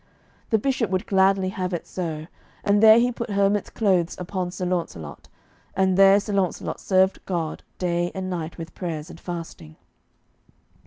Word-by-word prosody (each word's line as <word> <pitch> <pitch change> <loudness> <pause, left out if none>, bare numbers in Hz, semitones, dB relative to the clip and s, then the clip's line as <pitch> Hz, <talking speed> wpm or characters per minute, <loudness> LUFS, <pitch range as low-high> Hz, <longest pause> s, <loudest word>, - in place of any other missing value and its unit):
The 220 - +4
Bishop 250 -2 0
would 185 0 -1
gladly 190 -1 +3
have 185 -1 -3
it 170 - -6
so, 160 -4 -4 0.4
and 205 0 +3
there 220 0 +9
he 245 +1 +3
put 235 -1 -5
hermit's 200 0 +1
clothes 185 -6 +1
upon 180 0 -3
Sir 180 +1 -4
Launcelot, 165 - -4 0.5
and 190 -1 +2
there 195 +1 +7
Sir 205 0 -5
Launcelot 190 -3 -1
served 190 0 +2
God 170 -4 -2 0.2
day 175 -1 0
and 190 -1 -3
night 170 -3 -4
with 165 -1 -8
prayers 165 -2 -5
and 165 - -12
fasting. 165 - -7
185 Hz, 160 wpm, -24 LUFS, 170-200 Hz, 0.5 s, there